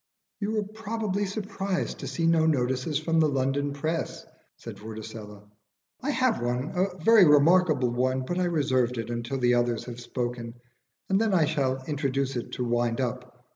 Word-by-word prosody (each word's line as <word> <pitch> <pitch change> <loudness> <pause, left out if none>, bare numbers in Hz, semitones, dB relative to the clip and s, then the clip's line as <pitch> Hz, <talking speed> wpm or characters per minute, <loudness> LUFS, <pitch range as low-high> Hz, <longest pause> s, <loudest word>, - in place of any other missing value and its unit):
"You 215 +1 -1
are 210 - +1
probably 215 -1 -3
surprised 195 -2 -3
to - - -5
see 165 - -2
no 165 -1 +4
notices 130 0 0
from 165 +2 +1
the 155 -1 +4
London 135 +1 0
press," 155 +4 -3 0.3
said - - -9
Vorticella. 110 -1 -9 0.6
"I 270 - -2
have 255 -5 +1
one 125 +4 -1
a 185 0 0
very 225 0 +7
remarkable 150 -3 +4
one. 130 +2 0
But 175 +6 -2
I 180 - +2
reserve 130 -7 +1
it 115 +1 -4
until 120 +3 -3
the 125 -1 +3
others 120 -1 +1
have 120 -1 -7
spoken, 120 -1 -4 0.5
and 195 +2 +2
then 220 -4 +2
I 165 -4 +4
shall 135 -4 -1
introduce 140 -2 -1
it 120 - -5
to 125 - -2
wind 120 0 0
up. 125 0 -4
140 Hz, 175 wpm, -27 LUFS, 125-180 Hz, 0.6 s, very